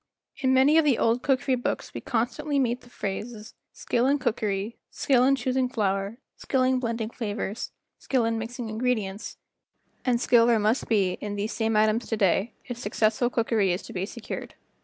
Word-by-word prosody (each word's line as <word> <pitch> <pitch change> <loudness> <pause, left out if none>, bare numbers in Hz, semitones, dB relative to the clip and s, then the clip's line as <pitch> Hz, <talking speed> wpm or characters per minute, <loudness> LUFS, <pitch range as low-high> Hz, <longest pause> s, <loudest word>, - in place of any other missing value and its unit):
In 260 -1 +1
many 270 +5 +5
of - - +4
the 280 -6 +3
old 230 +2 +2
cookery 265 0 +1
books 245 -1 -2
we - - -5
constantly 280 +5 -1
meet 250 -2 +1
the 245 - -17
phrases 215 +1 -5 0.2
"Skill 240 +2 0
in 285 +1 +3
cookery," 215 -4 -2
"Skill 255 -3 +2
in 270 +2 +5
choosing 255 0 0
flour," 200 -2 -1 0.2
"Skill 265 -2 0
in 255 0 +2
blending 230 -2 -2
flavors," 210 -2 -4 0.3
"Skill 255 -4 +1
in 225 0 0
mixing 235 +1 -5
ingredients," 220 -3 -2 0.7
and 245 -2 +2
skill 235 -1 +5
there 235 -1 +4
must 215 +4 +1
be 195 -5 +2
in 205 -1 -4
these 205 +2 -2
same 225 -1 0
items 215 +2 +2
to 225 - -1
day 195 +3 +2
if 245 -1 -6
successful 220 +2 +1
cookery 225 -5 +1
is 175 - -2
to - - -10
be 185 +1 -2
secured. 235 0 -7
230 Hz, 180 wpm, -26 LUFS, 215-255 Hz, 0.7 s, many